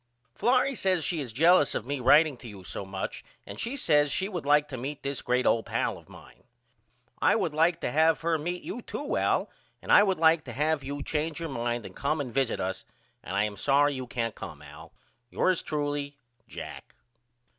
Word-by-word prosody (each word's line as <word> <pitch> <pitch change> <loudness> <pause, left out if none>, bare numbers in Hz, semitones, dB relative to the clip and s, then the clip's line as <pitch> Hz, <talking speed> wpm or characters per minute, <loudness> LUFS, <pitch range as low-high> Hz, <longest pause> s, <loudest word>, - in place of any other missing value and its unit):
Florrie 255 - +2
says 190 -7 +1
she 165 0 -1
is 125 -5 -5
jealous 165 +5 +4
of - - -3
me 140 +1 -3
writeing 150 +4 +5
to 120 - -11
you 100 -4 -10
so 95 - -6
much 95 0 -5 0.2
and - - -9
she 245 +5 -3
says 145 - +3
she 190 - -1
would 175 -8 -5
like 145 0 +4
to 135 - -7
meet 135 +4 -6
this 140 -1 -3
great 125 +1 0
old 115 - +2
pal - - -1
of - - -15
mine. - - -15 0.8
I - - +4
would 185 -8 0
like 165 +2 +2
to - - -1
have 160 +3 +3
her 165 -1 +1
meet 175 +4 -4
you 245 - -5
to 290 +5 -4
Al - - +1 0.3
and - - -5
I - - +9
would 195 -2 +2
like 160 -1 +4
to 120 - -7
have 150 +2 0
you 140 +1 -5
change 155 0 -2
your 165 -1 -4
mind 120 -3 -2
and - - -10
come 150 +3 -1
and 130 -5 -4
visit 135 -3 0
us 95 0 -3 0.4
and 95 - -6
I 100 - +3
am 105 -1 -3
sorry 145 +5 +3
you 130 -2 -5
can't 115 -2 -2
come 75 -5 -9
Al. 75 0 -12 0.4
Yours 185 -2 +1
truly, 145 -1 -3 0.3
JACK. - - -9
145 Hz, 210 wpm, -28 LUFS, 125-165 Hz, 0.8 s, I